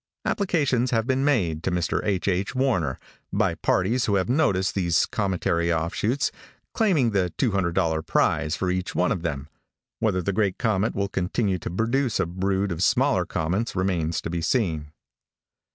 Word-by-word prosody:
Applications 145 - +1
have 115 -2 +1
been 130 +1 +1
made 95 - +1
to - - -1
Mr. 90 -2 0
H. 100 -3 -1
H. 95 +5 0
Warner, 95 - +1 0.3
by - - +1
parties 115 +7 +1
who 100 - +1
have 95 +3 0
noticed 100 -10 +2
these 85 -4 +2
cometary 90 -4 0
offshoots, 85 - 0 0.4
claiming 165 - +2
the 95 -4 +1
$200 90 - +1
prize 80 0 +1
for 90 -1 -1
each 90 0 -3
one 90 - +2
of 90 - -1
them. 70 -4 -3 0.5
Whether 95 -5 0
the 100 - -1
great 100 -2 0
comet 110 -1 0
will 100 0 0
continue 95 +1 -1
to - - -5
produce 115 +6 0
a - - +2
brood 95 +3 -1
of 85 0 -3
smaller 125 -4 +2
comets 90 +9 -2
remains 85 -4 0
to - - -5
be 85 -1 -2
seen." 80 - 0
95 Hz, 165 wpm, -25 LUFS, 85-115 Hz, 0.5 s, noticed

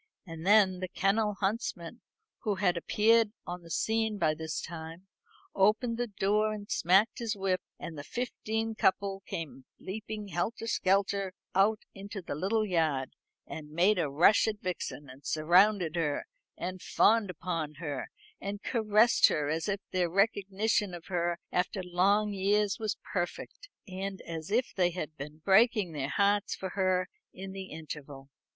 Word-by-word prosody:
And 165 0 -7
then 200 -3 +5
the 185 - -3
kennel 205 +3 +1
huntsman, 200 -1 -2 0.4
who 210 -4 -1
had 185 -2 +2
appeared 220 +5 +3
on 175 0 -5
the 170 - -14
scene 220 +3 0
by 155 -4 +2
this 160 0 -4
time, 165 +2 -8 0.5
opened 225 +4 +2
the 245 - 0
door 210 +1 +1
and 205 -1 -7
smacked 195 +8 +3
his 230 -2 -2
whip; 190 -2 0 0.2
and 165 - -7
the 145 - -7
fifteen 225 0 -3
couple 195 -2 +1
came 160 -8 -6
leaping 210 +1 -6
helter 205 +6 -2
skelter 195 -2 +1 0.2
out 205 +3 +3
into 200 +1 -7
the 180 - -5
little 200 +8 0
yard, 160 -8 0 0.3
and 150 -2 -8
made 180 +6 +3
a 155 - 0
rush 170 +11 +5
at 215 -1 -2
Vixen, 175 -5 -4
and 130 +2 -13
surrounded 175 +2 +3
her, 150 -4 -1 0.3
and 185 +1 -5
fawned 220 -2 +3
upon 165 -3 -3
her, 145 -3 -5 0.3
and 200 +1 -5
caressed 220 0 +4
her 150 -1 0
as 160 +5 -1
if 200 0 -1
their 180 -2 +1
recognition 200 0 +1
of 170 - -10
her 175 -1 0
after 185 +1 -1
long 200 +4 +2
years 200 +1 +1
was 215 -2 -2 0.2
perfect, 185 - -4 0.2
and 190 +1 -5
as 165 0 -6
if 240 +4 +1
they 180 -2 +3
had 160 -3 -5
been 150 +2 -9
breaking 210 -2 +4
their 140 -3 -3
hearts 200 +2 +2
for 190 - -5
her 185 -1 +1 0.3
in 190 +1 -7
the 190 0 -6
interval. 145 -4 -9
190 Hz, 160 wpm, -30 LUFS, 170-210 Hz, 0.5 s, then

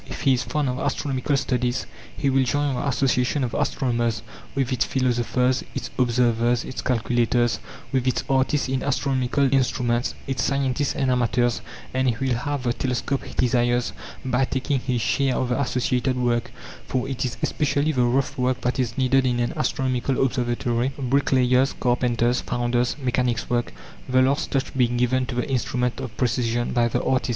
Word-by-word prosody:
If - - -7
he 135 -2 +4
is 125 - +1
fond 150 +1 -1
of 125 +1 -2
astronomical 140 0 -1
studies 125 -2 -1 0.3
he 140 - +1
will 135 0 +3
join 145 +2 0
the 130 - -2
association 130 0 +1
of 120 - -2
astronomers, 120 -3 0 0.3
with 135 -1 0
its 120 -4 +2
philosophers, 125 +1 +1
its - - -4
observers, 120 -1 +2
its 130 - -5
calculators, 120 0 +1 0.3
with 130 -1 0
its 130 - +1
artists 135 +2 +1
in 130 0 -1
astronomical 135 0 +1
instruments, 120 -2 +1
its 135 -1 -2
scientists 140 0 0
and 135 -2 +1
amateurs, 120 -1 +1 0.3
and 130 0 +2
he 115 - 0
will 135 -1 +1
have 135 +3 -2
the 120 -1 +1
telescope 130 +2 -2
he - - -10
desires 120 -1 +1 0.3
by 130 0 +1
taking 130 +1 -1
his 125 -2 -1
share 135 +3 +1
of 130 - -1
the 125 +3 +1
associated 125 0 0
work, 120 0 0 0.4
for 130 0 -1
it 135 0 -3
is 125 -1 -3
especially 150 0 +1
the 130 -4 +1
rough 135 +3 0
work 125 0 +1
that 125 +2 -1
is 120 -3 -1
needed 135 0 +3
in 120 -1 0
an 120 - 0
astronomical 130 -4 0
observatory 120 -1 0
bricklayer's, 130 -1 +2
carpenter's, 120 -1 +1
founder's, 120 0 0
mechanic's 125 -3 -1
work, 120 -1 0 0.4
the 130 0 +4
last 135 +2 +1
touch 135 -1 -2
being 120 -2 +2
given 125 +1 +1
to - - -4
the 125 - -1
instrument 125 -1 -1
of 130 -4 -7
precision 120 -1 0
by 120 -1 +3
the 120 - -1
artist. 130 -1 +1
125 Hz, 175 wpm, -24 LUFS, 120-135 Hz, 0.4 s, he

